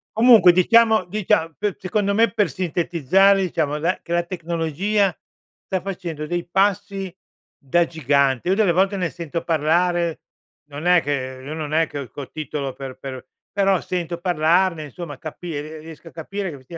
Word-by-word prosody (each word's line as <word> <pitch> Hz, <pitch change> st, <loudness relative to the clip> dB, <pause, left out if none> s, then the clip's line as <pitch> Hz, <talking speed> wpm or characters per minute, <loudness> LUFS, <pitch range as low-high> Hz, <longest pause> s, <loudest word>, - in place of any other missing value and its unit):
Comunque, 225 Hz, -5 st, +7 dB
diciamo 220 Hz, +3 st, +4 dB
dicia 175 Hz, -4 st, 0 dB
pe 205 Hz, -2 st, -2 dB
secondo 200 Hz, +2 st, 0 dB
me, 225 Hz, +3 st, +3 dB
per 210 Hz, -6 st, +1 dB
sintetizzare, 180 Hz, +4 st, +2 dB
diciamo, 155 Hz, -5 st, -1 dB
la 165 Hz, +4 st, -1 dB
che -, -, -11 dB
la 175 Hz, 0 st, +2 dB
tecnologia 175 Hz, +3 st, -1 dB, 0.5 s
sta 190 Hz, -1 st, -2 dB
facendo 175 Hz, -6 st, -5 dB
dei 175 Hz, +2 st, -3 dB
passi 195 Hz, 0 st, 0 dB, 0.4 s
da 170 Hz, +6 st, +1 dB
gigante. 140 Hz, -2 st, +1 dB
Io 190 Hz, -, +3 dB
delle 205 Hz, -4 st, +3 dB
volte 195 Hz, +3 st, +2 dB
ne 180 Hz, -3 st, -1 dB
sento 170 Hz, -1 st, -5 dB
parlare, 170 Hz, +1 st, +1 dB, 0.5 s
non 145 Hz, +3 st, -7 dB
è 180 Hz, -1 st, +5 dB
che 130 Hz, -3 st, -3 dB
io 145 Hz, +3 st, -6 dB
non 155 Hz, -1 st, -5 dB
è 160 Hz, +1 st, +3 dB
che 145 Hz, -, -6 dB
ho 135 Hz, -4 st, -7 dB
co 140 Hz, -2 st, -8 dB
titolo 145 Hz, -3 st, -4 dB
per 130 Hz, -1 st, -8 dB
per 130 Hz, -1 st, -8 dB, 0.2 s
però 195 Hz, -2 st, +2 dB
sento 170 Hz, -1 st, -4 dB
parlarne, 175 Hz, 0 st, +2 dB
insomma, 145 Hz, 0 st, -8 dB
capi 160 Hz, +3 st, -7 dB
ehm, 155 Hz, +2 st, -6 dB
riesco 160 Hz, +1 st, -12 dB
a -, -, -11 dB
capire 195 Hz, +4 st, -5 dB
che 140 Hz, +3 st, -10 dB
170 Hz, 170 wpm, -22 LUFS, 150-190 Hz, 0.5 s, Comunque